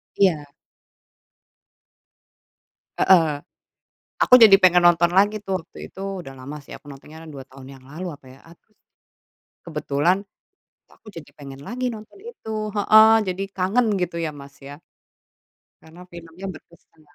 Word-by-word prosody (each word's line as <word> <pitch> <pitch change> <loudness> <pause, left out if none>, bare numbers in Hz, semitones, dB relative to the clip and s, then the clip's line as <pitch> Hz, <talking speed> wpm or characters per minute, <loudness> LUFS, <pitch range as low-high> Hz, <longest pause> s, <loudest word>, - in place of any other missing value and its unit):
Iya. 160 -7 +1 2.5
Heeh. 160 -6 +3 0.7
Aku - - +1
jadi 210 -3 +9
pengen 180 -2 +4
nonton 170 0 +3
lagi 205 +3 +3
tuh. 190 -2 -2
Waktu - - -20
itu 190 - -11 0.2
udah 135 - -10
lama 135 +3 -9
sih, - - -13
aku - - -13
nontonnya 150 +3 -13
2 135 -3 -10
tahun 135 -1 -15
yang 130 - -21
lalu 165 +7 -8
apa 140 - -25
ya 135 - -19
atau 170 - -21
s - - -48 0.9
kebetulan 160 +4 -1 0.6
kok - - -24
aku 225 - -15
jadi 165 -5 -12
pengen 140 -1 -12
lagi 250 +1 -3
nonton 215 - -12
itu, 220 - -6
heeh, 215 +2 +6 0.2
jadi 185 +1 -4
kangen 195 +6 0
gitu 175 -1 -3
ya, 160 - -2
Mas, 140 -1 -13
ya. 140 +1 -11 1.0
Karena 165 +3 -16
filmnya 170 +2 -11
berkesan. 165 -1 -20
170 Hz, 145 wpm, -22 LUFS, 145-195 Hz, 2.5 s, jadi